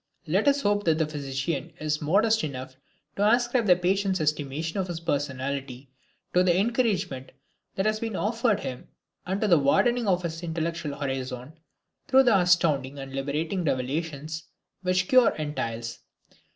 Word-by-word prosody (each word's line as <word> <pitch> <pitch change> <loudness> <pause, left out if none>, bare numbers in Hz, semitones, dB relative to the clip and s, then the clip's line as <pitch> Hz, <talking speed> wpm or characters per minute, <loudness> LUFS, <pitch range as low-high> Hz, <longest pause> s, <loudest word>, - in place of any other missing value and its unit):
Let - - +1
us 280 0 +4
hope 205 0 +1
that 160 -2 +3
the 160 - +2
physician 140 0 -3
is 150 0 -1
modest 215 +8 +3
enough 130 -3 -5 0.4
to 205 +1 +3
ascribe 240 -1 +2
the 180 - +7
patient's 190 +1 +1
estimation 150 +3 -1
of 190 - -1
his 175 -2 -4
personality 135 -3 -3 0.4
to 180 - +5
the 180 -1 +3
encouragement 200 - 0 0.4
that 190 - 0
has 215 0 +1
been 225 -2 -3
offered 225 +1 +1
him 125 -1 -6 0.4
and 190 +2 -1
to 215 - +2
the 170 -5 +5
widening 235 - +2
of 180 -2 +2
his 165 -1 -4
intellectual 165 -3 -3
horizon 130 -1 -4 0.5
through 265 0 +6
the 240 -5 +4
astounding 155 -7 +2
and 135 -1 -8
liberating 150 +7 -2
revelations 155 +3 -2 0.4
which 185 -1 +2
the - - -17
cure 255 -2 +5
entails. 115 -7 -4
165 Hz, 155 wpm, -26 LUFS, 140-195 Hz, 0.5 s, the